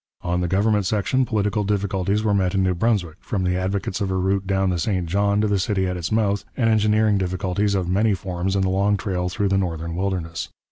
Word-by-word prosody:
On 90 0 0
the 90 - 0
government 100 +2 +1
section 110 +6 +1
political 105 -2 0
difficulties 100 0 0
were 105 -2 +2
met 95 -1 +1
in 95 - +2
New 95 -1 +2
Brunswick, 90 -4 0
from 95 -3 -3
the 90 0 +1
advocates 95 +2 -2
of 100 - 0
a 95 - -1
route 95 +1 0
down 95 -1 +1
the 90 - -1
St 90 +1 0
John 100 +4 +1
to 110 - +2
the 100 -1 +1
city 95 0 0
at 90 0 -2
its 85 -2 -4
mouth, 105 -2 +1
and 115 -3 +2
engineering 105 -1 +3
difficulties 95 +2 -1
of 95 -2 -1
many 100 +3 +2
forms 95 0 -3
in 95 - +2
the 95 - +1
long 100 +2 +2
trail 90 -2 -2
through 100 +2 -1
the 95 0 +2
northern 85 -2 -3
wilderness. 90 -3 -3
95 Hz, 230 wpm, -22 LUFS, 90-105 Hz, -, engineering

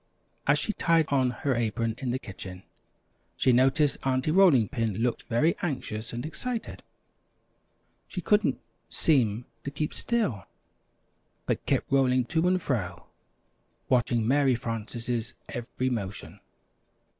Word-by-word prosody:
As - - +5
she 215 - -1
tied 165 -4 +3
on 130 -3 +3
her 130 +2 -1
apron 115 -1 0
in 130 - -3
the 125 - 0
kitchen, 95 -4 -9 0.7
she 130 - +4
noticed 135 +4 +3
Aunty 130 +2 +1
Rolling 160 - +5
Pin 115 -2 -2
looked 120 +3 -1
very 150 +9 +3
anxious 120 -8 -3
and 120 +3 -4
excited. 225 +10 -4 1.3
She 185 - -5
couldn't 210 +4 +2 0.3
seem 120 -7 +2 0.2
to - - -3
keep 150 +2 -3
still, 170 - -1 1.0
but - - -1
kept - - 0
rolling 130 -2 +3
to 165 +2 +3
and 185 0 +3
fro, 90 - -3 0.8
watching 120 -2 +2
Mary 135 -1 +4
Frances' 115 0 -4
every 125 +2 -3
motion. 105 -4 -5
125 Hz, 125 wpm, -28 LUFS, 115-150 Hz, 1.3 s, As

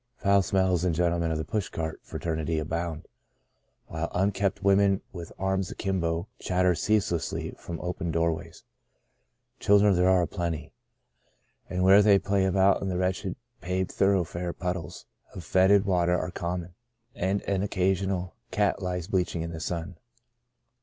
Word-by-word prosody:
Foul 100 -4 +3
smells 95 -1 +1
and 90 -3 +1
gentlemen 85 0 +1
of 80 - -1
the 80 - -3
push 105 +2 -2
cart 80 -1 -4
fraternity 80 -1 -3
abound, 80 +1 -3 0.8
while 80 +1 -4
unkempt 100 +1 0
women 100 0 +4
with 85 -3 -8
arms 95 0 -1
akimbo 85 -2 -2
chatter 90 0 +2
ceaselessly 90 -4 -1
from 85 -1 -6
open 90 0 -3
doorways. 85 0 -2 1.0
Children 100 0 +5
there 90 +1 +3
are 95 -1 +4
aplenty; 85 -2 -4 1.0
and 90 0 -1
where 95 +2 +7
they 100 -1 +6
play 100 0 +1
about 95 +1 +3
in 95 - -2
the 90 - -1
wretchedly 90 0 -1 0.3
paved 95 +1 -2
thor 100 +1 +3
oughfare 85 -1 -2
puddles 90 -1 -5 0.3
of 90 - -7
foetid 95 +4 +4
water 90 -2 +2
are 90 - -3
com 90 +1 -3
mon, 85 +1 -12 0.4
and 95 +3 -1
an 100 -1 -1
occasional 95 -1 0 0.2
dead - - -37
cat 100 -1 +2
lies 90 -2 -2
bleach 95 -4 0
ing 80 - -2
in 85 - -5
the 80 - -6
sun. 85 +1 -4
90 Hz, 155 wpm, -27 LUFS, 85-95 Hz, 1.0 s, where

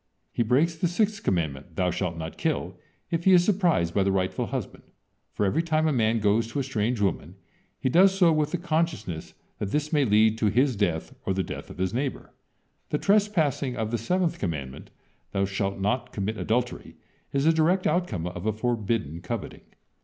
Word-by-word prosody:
He - - -1
breaks 135 +9 +3
the 165 +2 0
sixth 205 +4 0
commandment: 80 -3 -2
"Thou 90 0 +1
shalt 90 -1 -2
not 80 0 -6
kill," 125 - -2 0.4
if 170 0 -1
he 190 - +7
is 175 -1 +7
surprised 175 - +2
by 100 - +2
the 95 0 +2
rightful 95 -1 -1
husband, - - -5 0.5
for 105 - -1
every 140 +12 +2
time 160 -1 +1
a 155 - +2
man 115 -2 +2
goes 110 +1 +2
to 120 +5 -3
a - - 0
strange 120 -2 -1
woman, 95 -3 -1 0.4
he - - -1
does 185 +8 +6
so 175 -4 +5
with 155 -1 +1
the 175 - -1
consciousness 160 - -2 0.2
that 105 - -2
this 150 +6 -1
may 145 -2 +4
lead 110 -1 +3
to 110 - +2
his 125 +5 +2
death 85 -6 -1
or 95 - -1
the 95 - 0
death - - -7
of - - -10
his 95 +2 -1
neighbor. 135 +2 -3 0.6
The 150 - 0
trespassing 170 -10 +1
of 110 -1 -2
the 120 - -1
seventh 175 - 0
commandment: 70 -8 -4 0.4
"Thou 100 0 +1
shalt 100 0 -2
not 120 +5 -1
commit 105 +2 -2
adultery," 120 +3 -2 0.4
is 140 +1 0
the 165 - +5
direct 170 +4 +2
outcome 120 - 0
of 90 +3 -5
a 110 - +2
forbidden 110 - -2
coveting. 100 +3 -5
115 Hz, 195 wpm, -26 LUFS, 95-155 Hz, 0.6 s, he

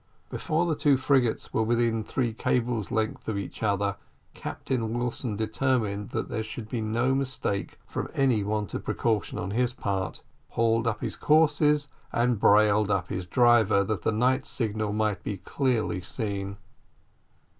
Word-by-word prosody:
Before 160 +3 0
the 165 -3 0
two 145 -2 +3
frigates 130 -3 +1
were - - +2
within 115 0 +1
three 120 0 -1
cables 115 -2 0
length 110 -1 -2
of 110 -2 -1
each 100 - -6
other, 100 -2 0 0.4
Captain 115 -3 -3
Wilson, 120 -2 -2
determined 110 -2 0
that - - -3
there 110 - -2
should 110 0 -6
be 115 0 -3
no 115 +4 +1
mistake 130 -7 -2
from - - -4
any 130 -6 +3
want 105 -1 -2
of - - -3
precaution 110 -3 -1
on 90 +2 -3
his 125 +3 +1
part, 100 -6 -3 0.3
hauled 115 0 +2
up 110 -2 -1
his - - -3
courses 150 -1 +3 0.2
and 120 -2 +1
brailed 105 0 +5
up 95 -3 0
his 90 -1 -4
driver 110 -3 +4
that 100 -2 -2
the - - +1
night 130 +5 +1
signal 110 -3 -1
might 105 -1 0
be 100 - -3
clearly 120 -3 -1
seen. 100 0 -3
110 Hz, 155 wpm, -27 LUFS, 105-125 Hz, 0.4 s, brailed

